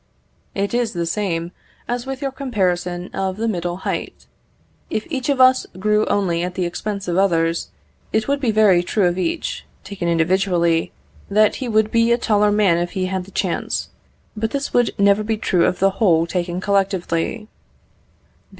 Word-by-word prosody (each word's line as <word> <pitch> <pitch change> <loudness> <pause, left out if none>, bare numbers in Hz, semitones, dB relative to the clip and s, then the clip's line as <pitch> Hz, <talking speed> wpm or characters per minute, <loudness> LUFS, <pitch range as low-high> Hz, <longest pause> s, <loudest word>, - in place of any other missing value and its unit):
It 200 +2 -1
is 240 -2 0
the 170 -2 -2
same 170 -2 -2 0.4
as 245 +1 -3
with 270 0 -5
your 275 - -1
comparison 180 -9 -2
of 190 0 -2
the 225 +1 -1
middle 175 -4 -2
height. - - -4 0.6
If 215 - -2
each 260 -2 -2
of 275 -2 +1
us 255 0 +5
grew 210 +2 +1
only 175 -4 +1
at 180 +1 -3
the 180 - -1
expense 200 +3 -4
of 175 +1 +1
others, 165 -3 +1 0.4
it 220 0 0
would 280 0 +1
be 260 -4 0
very 210 -5 +4
true 195 +2 0
of 175 +1 +1
each, 330 - -2 0.2
taken 190 -4 -5
individually, 170 0 +1 0.4
that 210 +1 +3
he 260 - -4
would 220 -1 +2
be 230 0 +3
a 235 - +4
taller 210 -3 +2
man 200 -5 +3
if 175 0 -3
he 185 -1 -1
had 185 0 -3
the - - -14
chance, - - -2 0.5
but 220 +1 -1
this 280 +2 -3
would 245 -2 +3
never 200 +1 +4
be 220 +1 -1
true 180 -4 +2
of - - -1
the 195 +1 +3
whole 175 -6 +3
taken 175 0 -2
collectively. 195 +1 -1
200 Hz, 175 wpm, -20 LUFS, 175-220 Hz, 0.6 s, us